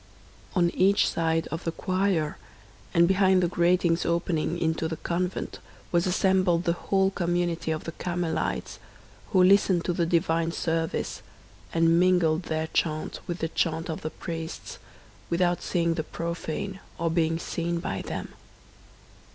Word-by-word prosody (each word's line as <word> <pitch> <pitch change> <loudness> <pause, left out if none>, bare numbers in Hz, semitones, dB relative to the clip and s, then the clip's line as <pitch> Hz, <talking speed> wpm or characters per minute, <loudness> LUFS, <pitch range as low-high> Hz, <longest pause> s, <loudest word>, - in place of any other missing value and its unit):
On 175 -1 +3
each 195 +2 +3
side 165 0 0
of 165 - -4
the 165 - -1
choir 185 -4 0 0.5
and 170 0 +5
behind 190 -1 +4
the - - +3
gratings 175 0 +2
opening 170 0 0
into 160 -1 0
the 160 0 -4
convent 180 +3 -3 0.3
was 175 +1 +2
assembled 185 -2 +2
the 170 - +2
whole 190 +2 +1
community 175 -2 -1
of 155 -1 -1
the 165 - -5
Carmelites, 175 -1 -2 0.5
who 185 -3 +4
listened 190 -2 +4
to 175 - +1
the 170 -1 0
divine 165 -1 +1
service, 165 -1 -2 0.5
and 165 0 +4
mingled 175 -2 +3
their 160 0 0
chant 155 -1 -1
with 175 - -3
the 165 -1 -2
chant 165 0 -1
of 160 - -5
the 155 - -3
priests, 165 0 -6 0.5
without 175 0 +1
seeing 170 -2 +1
the 160 - -2
profane, 170 +4 -4 0.2
or 165 -1 0
being 165 -1 +1
seen 170 0 -2
by 170 - -3
them. - - -5
170 Hz, 145 wpm, -27 LUFS, 165-180 Hz, 0.5 s, and